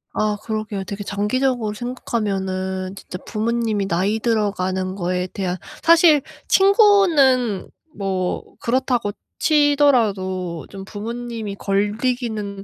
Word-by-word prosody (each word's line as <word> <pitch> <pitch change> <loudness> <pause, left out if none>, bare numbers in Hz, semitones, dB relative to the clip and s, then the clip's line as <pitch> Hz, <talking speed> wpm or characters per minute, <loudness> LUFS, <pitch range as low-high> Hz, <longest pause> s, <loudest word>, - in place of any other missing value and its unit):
아 215 -1 0
그러게요. 215 -3 -3
되게 200 +2 -6
장기적으로 215 +3 0
생각하면은 190 -6 -3
진짜 180 - -8
부모님이 220 -2 -1
나이 195 +5 0
들어가는 190 -5 0
거에 180 -1 -1
대한 185 -2 -2 0.2
사실 330 -3 +6 0.3
친구는 350 - +4 0.3
뭐 190 -2 -2 0.2
그렇다고 245 -3 0 0.3
치더라도 220 - +2
좀 195 -1 -9
부모님이 225 0 -5
걸리기는 210 0 -1
210 Hz, 265 characters per minute, -21 LUFS, 195-245 Hz, 0.3 s, 사실